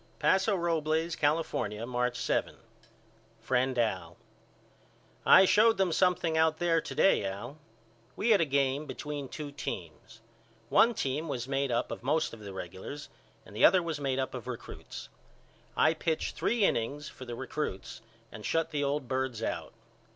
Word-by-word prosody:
Paso 195 Hz, +2 st, +3 dB
Robles, 165 Hz, -1 st, 0 dB
California, 145 Hz, -8 st, 0 dB
March 125 Hz, 0 st, -1 dB
7. -, -, -1 dB, 0.8 s
FRIEND 130 Hz, +2 st, 0 dB
AL: 95 Hz, -7 st, -1 dB, 1.1 s
I 190 Hz, -, +9 dB
showed 220 Hz, +3 st, +5 dB
them 190 Hz, -2 st, +2 dB
something 175 Hz, -1 st, +2 dB
out 160 Hz, 0 st, +3 dB
there 170 Hz, -2 st, +2 dB
to -, -, -7 dB
day 195 Hz, -, +4 dB
Al. 110 Hz, +10 st, -5 dB, 0.6 s
We 230 Hz, -, +1 dB
had 205 Hz, -, +6 dB
a -, -, +3 dB
game 140 Hz, +1 st, 0 dB
between 145 Hz, -2 st, -5 dB
two 150 Hz, -2 st, -6 dB
teams. 110 Hz, -, -7 dB, 0.5 s
One 235 Hz, +1 st, +5 dB
team 145 Hz, +2 st, -2 dB
was 125 Hz, -4 st, -3 dB
made 135 Hz, -1 st, 0 dB
up 115 Hz, -, 0 dB
of -, -, -5 dB
most 150 Hz, +4 st, 0 dB
of 115 Hz, -, -9 dB
the 100 Hz, -2 st, -8 dB
regulars 95 Hz, -, -7 dB, 0.4 s
and -, -, -14 dB
the -, -, 0 dB
other 180 Hz, 0 st, +7 dB
was 165 Hz, -3 st, -3 dB
made 135 Hz, -2 st, 0 dB
up 130 Hz, -1 st, -2 dB
of 125 Hz, -1 st, -7 dB
recruts. 125 Hz, -2 st, -8 dB, 0.7 s
I 155 Hz, -, +5 dB
pitched 160 Hz, 0 st, -2 dB
three 235 Hz, -2 st, +1 dB
innings 145 Hz, +5 st, -1 dB
for 130 Hz, -, -10 dB
the 120 Hz, -1 st, -6 dB
recruts 130 Hz, -6 st, -5 dB, 0.3 s
and 110 Hz, -, -10 dB
shut 165 Hz, +7 st, 0 dB
the 145 Hz, -1 st, -1 dB
old 140 Hz, -1 st, -1 dB
birds 130 Hz, -3 st, -2 dB
out. -, -, -3 dB
140 Hz, 160 wpm, -30 LUFS, 125-160 Hz, 1.1 s, I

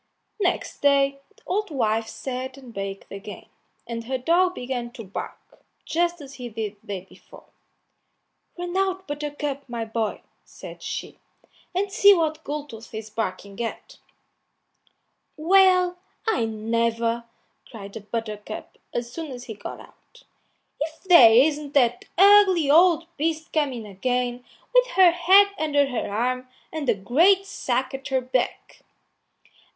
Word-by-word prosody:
Next 365 Hz, -3 st, -1 dB
day 275 Hz, -1 st, +3 dB, 0.2 s
the -, -, -25 dB
old 410 Hz, +2 st, -1 dB
wife 225 Hz, -6 st, 0 dB
sat 260 Hz, +1 st, -5 dB
and 255 Hz, -4 st, -13 dB
baked 195 Hz, -1 st, -6 dB
again, 200 Hz, +1 st, -9 dB, 0.4 s
and 230 Hz, -1 st, -5 dB
her 260 Hz, +2 st, -2 dB
dog 355 Hz, +7 st, +2 dB
began 245 Hz, -1 st, -4 dB
to 240 Hz, -3 st, -8 dB
bark, 195 Hz, -1 st, -9 dB, 0.2 s
just 345 Hz, 0 st, 0 dB
as 275 Hz, -1 st, -10 dB
he 250 Hz, -3 st, -7 dB
did 215 Hz, -2 st, -5 dB
the -, -, -27 dB
day 190 Hz, -2 st, -5 dB
before. -, -, -17 dB, 1.1 s
"Run 350 Hz, 0 st, -5 dB
out, 380 Hz, 0 st, 0 dB
Buttercup, 290 Hz, -2 st, -4 dB
my 235 Hz, -1 st, -3 dB
boy," 220 Hz, -1 st, -3 dB, 0.2 s
said -, -, -11 dB
she, -, -, -6 dB, 0.6 s
"and 390 Hz, +1 st, 0 dB
see 400 Hz, 0 st, +7 dB
what 315 Hz, -2 st, -1 dB
Goldtooth 285 Hz, -7 st, -7 dB
is 220 Hz, 0 st, -7 dB
barking 200 Hz, -1 st, -4 dB
at." 230 Hz, -, -6 dB, 1.4 s
"Well, 365 Hz, +1 st, +4 dB, 0.3 s
I 260 Hz, -, +1 dB
never!" 230 Hz, +1 st, -1 dB, 0.4 s
cried 205 Hz, -2 st, -10 dB
Buttercup, 215 Hz, -2 st, -6 dB, 0.2 s
as 240 Hz, 0 st, -3 dB
soon 325 Hz, -2 st, -5 dB
as 245 Hz, -1 st, -8 dB
he 225 Hz, -, -7 dB
got 210 Hz, -, -8 dB
out; -, -, -18 dB, 0.6 s
"if 310 Hz, +2 st, -5 dB
there 340 Hz, -12 st, +8 dB
isn't 290 Hz, +4 st, +3 dB
that 245 Hz, -3 st, +3 dB
ugly 380 Hz, -6 st, +6 dB
old 335 Hz, +1 st, +5 dB
beast 315 Hz, +1 st, -2 dB
coming 270 Hz, -8 st, -1 dB
again 245 Hz, +5 st, -2 dB, 0.3 s
with -, -, +5 dB
her 370 Hz, -2 st, +8 dB
head 375 Hz, +4 st, +6 dB
under 290 Hz, -2 st, +2 dB
her 250 Hz, -6 st, -3 dB
arm 255 Hz, +4 st, -1 dB, 0.3 s
and 305 Hz, -5 st, -2 dB
a 235 Hz, -, +4 dB
great 335 Hz, -, +3 dB
sack 260 Hz, -8 st, -2 dB
at 270 Hz, 0 st, -6 dB
her 265 Hz, -1 st, +1 dB
back." 255 Hz, 0 st, -3 dB
265 Hz, 140 wpm, -24 LUFS, 230-330 Hz, 1.4 s, there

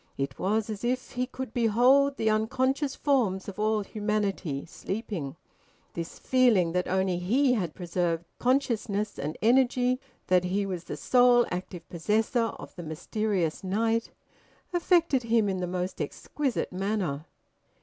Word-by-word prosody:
It 135 Hz, -1 st, -3 dB
was 210 Hz, +3 st, +1 dB
as 210 Hz, 0 st, -6 dB
if 255 Hz, +1 st, -1 dB
he 250 Hz, 0 st, -2 dB
could 260 Hz, -2 st, -6 dB
behold 250 Hz, +5 st, +4 dB
the 220 Hz, -, -1 dB
unconscious 260 Hz, +6 st, 0 dB
forms 225 Hz, -10 st, +1 dB
of 200 Hz, 0 st, -7 dB
all 215 Hz, 0 st, +2 dB
humanity, 205 Hz, -9 st, -2 dB
sleeping. 190 Hz, -, -5 dB, 0.6 s
This 170 Hz, 0 st, -6 dB
feeling 235 Hz, -10 st, +3 dB
that 180 Hz, +1 st, 0 dB
only 190 Hz, -1 st, +1 dB
he 250 Hz, +9 st, +3 dB
had 180 Hz, -9 st, -2 dB
preserved 175 Hz, -1 st, -1 dB
consciousness 230 Hz, -5 st, 0 dB
and 150 Hz, +3 st, -4 dB
energy, 250 Hz, +1 st, +3 dB, 0.3 s
that 180 Hz, -1 st, +3 dB
he 195 Hz, +3 st, 0 dB
was 180 Hz, -3 st, -4 dB
the -, -, -5 dB
sole 245 Hz, -1 st, +5 dB
active 180 Hz, -1 st, -5 dB
possessor 220 Hz, +7 st, +1 dB
of -, -, -11 dB
the 175 Hz, -, -7 dB
mysterious 175 Hz, +2 st, -2 dB
night, 225 Hz, +4 st, 0 dB, 0.6 s
affected 340 Hz, -6 st, +3 dB
him 230 Hz, -2 st, +2 dB
in 190 Hz, -1 st, -1 dB
the 180 Hz, -, -2 dB
most 180 Hz, 0 st, -3 dB
exquisite 260 Hz, -, -2 dB
manner. 185 Hz, -6 st, -2 dB
210 Hz, 140 wpm, -28 LUFS, 180-245 Hz, 0.6 s, sole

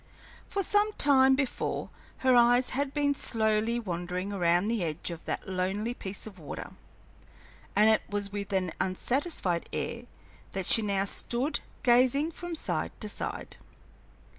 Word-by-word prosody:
For 395 Hz, -, -1 dB
some 415 Hz, +3 st, +2 dB
time 265 Hz, -4 st, +5 dB
before 270 Hz, -2 st, -2 dB, 0.3 s
her 255 Hz, -1 st, +6 dB
eyes 245 Hz, +1 st, +5 dB
had 280 Hz, +1 st, -1 dB
been 285 Hz, -1 st, +1 dB
slowly 220 Hz, -2 st, +1 dB
wandering 180 Hz, -1 st, -3 dB
around 175 Hz, 0 st, +2 dB
the 225 Hz, -4 st, 0 dB
edge 160 Hz, +1 st, -3 dB
of 165 Hz, -1 st, -7 dB
that -, -, -3 dB
lonely 190 Hz, +5 st, -1 dB
piece 195 Hz, -4 st, -7 dB
of 200 Hz, -4 st, -10 dB
water, 150 Hz, -, -7 dB, 1.0 s
and 210 Hz, +2 st, +6 dB
it 220 Hz, 0 st, +5 dB
was 205 Hz, -1 st, -2 dB
with 200 Hz, -1 st, -5 dB
an 185 Hz, -3 st, 0 dB
unsatisfied 190 Hz, -, -1 dB
air 235 Hz, +1 st, -4 dB, 0.5 s
that 190 Hz, -1 st, -3 dB
she 225 Hz, -, +6 dB
now 200 Hz, -2 st, 0 dB
stood 250 Hz, +8 st, -2 dB, 0.2 s
gazing 255 Hz, +5 st, +4 dB
from 350 Hz, 0 st, -5 dB
side -, -, -2 dB
to -, -, -3 dB
side. -, -, -5 dB
220 Hz, 145 wpm, -29 LUFS, 190-265 Hz, 1.0 s, her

